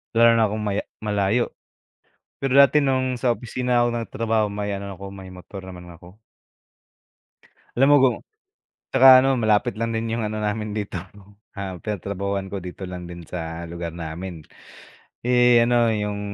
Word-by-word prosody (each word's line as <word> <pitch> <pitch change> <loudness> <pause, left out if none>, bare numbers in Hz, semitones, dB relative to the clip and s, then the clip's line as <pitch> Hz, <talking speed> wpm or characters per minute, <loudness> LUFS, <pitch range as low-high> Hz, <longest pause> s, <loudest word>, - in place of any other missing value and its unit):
Lalo 115 +1 +6
na 115 - +4
kung 105 +1 -3
maya 105 -1 -2 0.2
malayo. 105 +2 0 0.9
Pero 135 0 +1
dati 140 +2 +6
nung 130 -2 0
sa 120 -2 +2
opisina 125 0 0
ako - - +1
nagtrabaho, 115 -1 -1
may 105 0 -4
ano 100 0 -5
ako, 95 +1 -9
may 95 -1 -10
motor 95 +2 -10
naman 90 -1 -10
ako. 90 +3 -16 1.6
Alam 135 +2 +5
mo - - +8
kung 130 -3 +4 0.7
'tsaka 135 0 +5 0.2
ano, 135 - +2
malapit 110 -3 +2
lang 115 0 -2
din 115 0 -2
'yong 115 -1 -1
ano 105 0 -4
namin 105 0 -2
dito, 100 -3 -4 0.6
ah, 95 -3 -6
pinatrabahuan 100 -1 -4
ko, 100 - -4
dito 90 +1 -9
lang 90 -1 -6
din 85 0 -9
sa 80 -1 -6
lugar 85 -1 -6
namin. 85 0 -7 0.8
Eh, 125 -1 +5
ano, 120 0 +3
'yong, 105 -1 -2
105 Hz, 160 wpm, -23 LUFS, 95-115 Hz, 1.6 s, mo